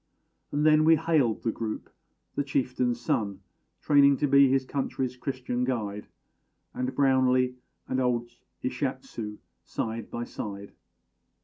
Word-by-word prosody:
And 145 +1 +1
then 155 0 +6
we 160 +1 +7
hailed 150 -9 +1
the 115 - +1
group: 110 -1 -4 0.5
the 145 - 0
chieftain's 125 -3 0
son, 100 -4 -1 0.4
Training 140 -1 +5
to 145 - +1
be 140 0 +6
his 135 0 +2
country's 130 -2 -2
Christian 125 -1 -3
guide 105 -5 -2 0.7
And 125 +1 -3
Brownlee 130 -2 +3 0.3
and 130 - -1
old 120 -1 0 0.3
Ishátshu 125 -5 -3 0.3
side 115 -1 -4
by 120 - -4
side. 100 -3 -6
125 Hz, 125 wpm, -28 LUFS, 120-140 Hz, 0.7 s, we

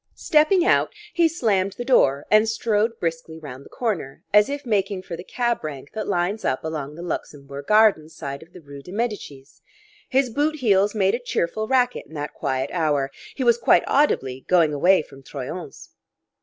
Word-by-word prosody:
Stepping 325 +4 +3
out, - - +3 0.2
he 340 -2 +4
slammed 205 - 0
the 240 +4 -6
door 140 - +3
and 215 +1 +5
strode 220 0 0
briskly 165 -1 -4
round 140 -4 -9
the - - -15
corner, 190 - -3
as 210 +2 +6
if 285 0 -5
making 195 -4 -1
for 170 - -6
the 175 - -9
cab 240 +2 -1
rank 145 -3 -7
that 220 0 -4
lines 195 +3 -1
up 130 - -1
along 150 -2 -5
the 170 - -8
Luxembourg 140 -4 -6
Gardens 210 -8 +4
side 140 -2 -6
of 165 +2 -16
the 180 - -13
rue 140 -2 -11
de 180 - -12
Medicis; 200 - -5 0.5
his 260 -2 +2
boot 295 +5 0
heels 205 -6 +2
made 195 -2 +2
a 235 - 0
cheerful 215 -3 -2
racket 250 -1 +1
in 160 - -14
that 145 0 -5
quiet 130 0 -2
hour; 145 -5 0 0.2
he 265 - -2
was 235 -1 +4
quite 235 - +4
audibly 135 - +1
going 170 -4 +3
away 175 +4 +4
from 135 -2 -15
Troyon's. 145 +4 -8
185 Hz, 185 wpm, -23 LUFS, 150-230 Hz, 0.5 s, as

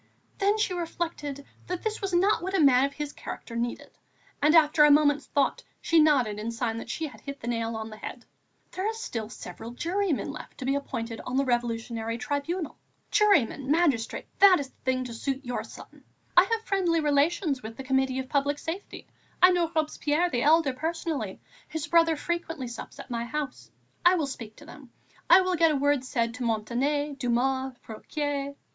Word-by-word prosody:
Then 405 +1 +3
she 425 -4 0
reflected 325 -5 -4 0.2
that 360 -1 -4
this 440 0 -2
was 390 -1 -2
not 380 +4 +3
what 380 +2 -2
a - - +3
man 270 -3 +6
of 280 - -4
his 295 -1 -5
character 230 - -8
needed; 235 +1 -3 0.5
and, 300 +3 +5
after 305 -1 +6
a 295 - +7
moment's 290 0 +4
thought, 280 - 0 0.2
she 330 - +3
nodded 260 -9 +3
in 220 +2 -3
sign 230 -1 -2
that 230 - -9
she 320 - -2
had 285 - -10
hit 280 0 -7
the 230 - -8
nail 230 -1 -1
on 220 0 -5
the 215 - -9
head: 245 +2 -8 0.5
"There 375 +2 -2
are - - -2
still 230 - -5
several 220 +1 -8
jurymen 335 +3 -1
left 305 - -10
to 260 - -6
be 270 - +2
appointed 230 -5 -4
on 250 +1 -3
the 275 - +2
Revolutionary 230 -2 -1
Tribunal. 290 +5 -3 0.3
Juryman, 285 - +3
magistrate, 290 -8 +1
that 390 -4 +8
is 275 -2 -5
the - - -37
thing 255 0 0
to 245 -2 -7
suit 270 +3 -3
your 245 0 -3
son. - - -13 0.3
I 355 - +8
have 450 +2 -2
friendly 360 -5 +1
relations 295 -1 +1
with 225 0 -8
the 270 - -6
Committee 265 0 +1
of 260 0 -3
Public 285 +1 +1
Safety. 330 +6 -6 0.3
I 365 +1 +8
know 345 -2 +1
Robespierre 310 +2 +1
the 240 - 0
elder 305 -1 +4
personally; 310 - -3 0.3
his 315 0 -4
brother 330 0 +4
frequently 325 -3 -3
sups 235 -1 -8
at - - -9
my 235 0 -2
house. 285 +1 -5 0.3
I 355 +1 +6
will 320 -4 0
speak 230 -5 -7
to 300 - -14
them. 290 -4 -13 0.4
I 380 - +9
will 370 0 0
get 330 -1 +4
a 305 - +1
word 285 -1 +2
said 235 -2 -1
to 250 +1 -5
Montané, 260 +6 0
Dumas, 260 +1 0
Fouquier." 280 +4 -4
285 Hz, 195 wpm, -27 LUFS, 245-330 Hz, 0.5 s, I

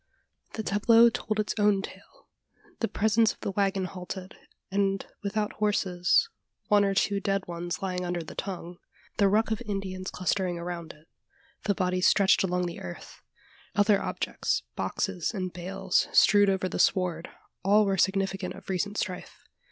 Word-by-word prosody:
The 220 - -4
tableau 230 +4 +5
told 215 -1 -3
its 210 - 0
own 205 -2 +3
tale. - - -12 0.5
The 225 - 0
presence 220 +1 +2
of - - -27
the - - -2
waggon 195 -1 0
halted, 185 0 -7 0.4
and 195 0 0 0.2
without 210 +1 -2
horses 190 -4 +2 0.4
one 205 -1 +5
or 195 -1 +1
two 200 +1 +1
dead 195 0 -1
ones 175 0 -4
lying 180 -1 -2
under 175 -1 -2
the 155 - -10
tongue 180 -3 -6 0.4
the 200 -1 +4
ruck 220 +3 +2
of 220 +1 -1
Indians 195 -3 -4
clustering 185 -1 -1
around 170 -1 -5
it 155 +2 -21 0.6
the 200 - +1
bodies 185 0 +1
stretched 200 -1 +4
along 180 -1 0
the 170 -1 -5
earth 90 - -9 0.5
other 205 0 +4
objects, - - -2
boxes, 180 - -2
and 185 -2 -3
bales, 190 +1 0
strewed 205 -1 +6
over 190 -1 0
the - - -4
sward 175 -3 +1 0.3
all 205 +2 +5
were 195 -1 +1
significant 190 0 0
of 195 0 -13
recent 200 +3 -2
strife. 180 -2 -5
195 Hz, 160 wpm, -28 LUFS, 180-205 Hz, 0.6 s, strewed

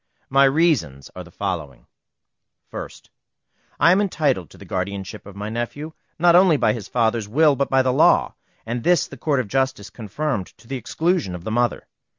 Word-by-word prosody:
My 135 +1 +5
reasons 135 - +1
are 90 - -7
the 90 - -15
following: 80 -10 -5 0.9
1st. - - -8 0.7
I 170 - +6
am 190 +3 +4
entitled 145 - 0
to - - -16
the - - -12
guardianship 95 +1 -5
of 100 - -11
my 105 +1 -5
nephew, 120 +7 -5 0.2
not 175 +1 +5
only 180 -4 +5
by - - +2
his 110 -5 -7
father's 115 -2 0
will, 150 +4 +4
but 140 +1 -1
by 135 0 +4
law, 130 0 +3 0.3
and 115 +1 -4
this 175 -1 +3
the - - -11
Court 140 +1 0
of 125 - -2
Justice 130 -3 -1
confirmed 120 -1 -3
to 115 +2 -20
the 135 - -4
exclusion 155 - -1
of 85 - -9
the 110 - -4
mother. 120 +1 0
120 Hz, 180 wpm, -22 LUFS, 100-150 Hz, 0.9 s, I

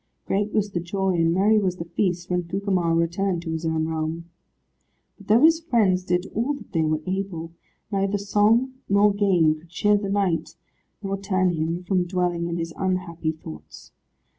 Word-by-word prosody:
Great 205 +2 0
was 210 -1 0
the 175 - -1
joy, 190 +2 -1
and 165 -1 +2
merry 205 +5 +4
was 185 -3 0
the 170 - -6
feast, 175 0 -1
when 180 0 +1
Gugemar 180 -1 0
returned 170 +2 0
to 165 - -4
his 160 0 -2
own 160 0 0
realm. 160 +1 -3 0.9
But 200 - -15
though 220 +3 +5
his 320 +1 +6
friends 215 - +2
did 180 0 0
all 245 +7 0
that 280 - -13
they 165 - +1
were 155 0 0
able, 185 -3 -3 0.4
neither 195 0 0
song 210 +6 +2 0.2
nor 200 +1 +4
game 185 -6 +3
could 165 +2 -20
cheer 205 +4 +2
the 200 -1 -3
knight, 195 -4 0 0.5
nor 195 0 -2
turn 185 -2 +1
him 165 +2 -2
from 180 0 +1
dwelling 175 -1 -1
in 170 0 -3
his 165 -1 -4
unhappy 180 -4 -1
thoughts. 80 - -12
185 Hz, 180 wpm, -24 LUFS, 170-200 Hz, 0.9 s, his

